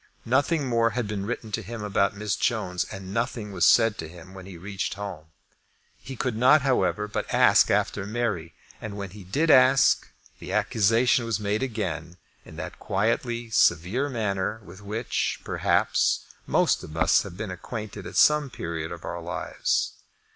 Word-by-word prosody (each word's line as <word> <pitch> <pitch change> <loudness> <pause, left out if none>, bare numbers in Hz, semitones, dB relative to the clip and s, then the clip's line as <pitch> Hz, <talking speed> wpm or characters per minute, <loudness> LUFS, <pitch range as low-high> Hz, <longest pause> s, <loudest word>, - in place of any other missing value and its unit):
Nothing 140 +4 +1
more 115 -1 +2
had 120 -4 -1
been 100 -1 -4
written 115 -2 -4
to - - -2
him 115 -2 -7
about 100 0 +1
Miss 105 0 -1
Jones, 105 -7 -1
and 95 0 -8
nothing 115 -2 -2
was 95 -3 +3
said 115 -2 +4
to 80 - -4
him 90 +2 -13
when 95 -1 -10
he 95 -3 -9
reached 95 +2 -4
home. 100 -6 -7 0.7
He 135 - -9
could 125 -1 -2
not, 130 +5 +5
however, 125 -5 +1
but 105 - -4
ask - - +5
after 100 0 0
Mary, 105 -8 -2 0.3
and 105 -2 -6
when 100 -2 -6
he 100 0 -11
did 150 - +1
ask, 130 +1 +5 0.3
the - - -7
accusation 115 +4 +3
was 115 -2 -1
made 105 +2 -1
again 90 -9 -4 0.3
in - - -12
that - - -7
quietly 115 +3 -1
severe 100 - +2
manner 105 -3 -2
with 95 +1 -13
which, 105 +4 -2
perhaps, - - +1 0.2
most - - +2
of 80 - -9
us 80 - +4
have 85 - -9
been 110 0 -4
made - - -4
acquainted 105 -3 -7
at - - -9
some 150 -2 +5
period 80 -7 -5
of 85 -1 -8
our 85 - -5
lives. 90 +1 -1
105 Hz, 175 wpm, -26 LUFS, 95-120 Hz, 0.7 s, not